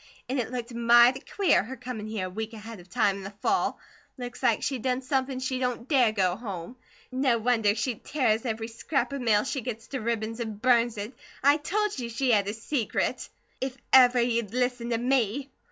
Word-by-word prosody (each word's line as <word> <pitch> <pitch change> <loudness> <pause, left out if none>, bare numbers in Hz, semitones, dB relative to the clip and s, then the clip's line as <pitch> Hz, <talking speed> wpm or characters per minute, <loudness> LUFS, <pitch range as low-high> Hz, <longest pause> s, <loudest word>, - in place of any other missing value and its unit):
An' 265 +1 -1
it 240 - -2
looked 245 -1 -5
mighty 235 +2 +5
queer, 395 +6 +2
her 250 +6 -7
comin' 245 -4 -6
here 215 -4 -3
a - - -5
week 220 +3 -5
ahead 220 -1 -9
of 175 +1 -16
time, 195 +1 +1
in 195 - -8
the 195 - -5
fall. 385 0 +1 0.4
Looks 245 -1 -7
like 240 -4 +2
she'd 265 -4 -1
done 255 +1 -1
somepin 260 0 -1
she 260 0 -2
don't 250 -1 -2
DARE 255 -7 +4
go 185 -4 +1
home. 200 -1 -7 0.4
No 255 -2 +2
wonder 225 -3 +2
she 250 +2 -1
tears 230 -7 +1
every 225 -2 -3
scrap 275 +5 -2
of 280 - -3
mail 215 -3 +3
she 270 0 -3
gets 225 -2 -5
to 270 - -3
ribbons 225 0 -2
an' 220 -3 -4
burns 235 0 +2
it. 210 +5 -5 0.3
I 285 +2 +6
told 410 +3 -1
you 235 -2 -4
she 245 +2 0
had 205 -3 +3
a 205 - -2
secret! 230 +1 -2 0.3
If 265 0 -3 0.2
ever 250 -1 +7
you'd 235 -2 0
listen 245 -1 0
to 230 - +1
me." 260 +2 0
240 Hz, 205 wpm, -27 LUFS, 220-260 Hz, 0.4 s, ever